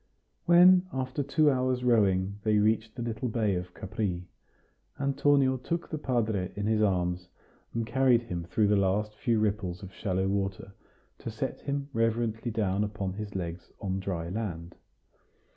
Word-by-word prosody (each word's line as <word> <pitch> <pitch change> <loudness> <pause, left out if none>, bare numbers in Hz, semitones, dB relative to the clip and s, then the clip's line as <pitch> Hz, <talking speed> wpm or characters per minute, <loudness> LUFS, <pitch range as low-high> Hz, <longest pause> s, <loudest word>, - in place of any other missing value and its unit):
When, 180 +1 +7
after 130 +1 -2
two 145 +2 +3
hours' 130 -1 0
rowing, 100 -4 +2
they 110 -1 +3
reached 110 +1 +1
the 120 - -4
little 115 +1 -3
bay 110 -3 +1
of 90 0 -4
Capri, 95 -3 -3 0.7
Antonio 140 -1 +3
took 170 +7 -3
the 155 - -3
padre 110 -9 -1
in 100 - -3
his 110 0 +2
arms, 90 -3 0 0.5
and 115 -1 0
carried 125 0 +3
him 90 -7 -4
through 105 +5 +1
the 105 - +4
last 100 +2 +1
few 115 +1 0
ripples 100 -4 -1
of 95 0 -9
shallow 95 -2 -1
water, 100 0 -2 0.5
to - - -5
set - - -4
him 140 0 -3
reverently 115 0 0
down 105 -3 0
upon 105 -3 -3
his 105 0 -7
legs 85 -1 -5
on 95 -1 -2
dry 90 -3 -3
land. 90 -5 -4
105 Hz, 160 wpm, -29 LUFS, 95-125 Hz, 0.7 s, When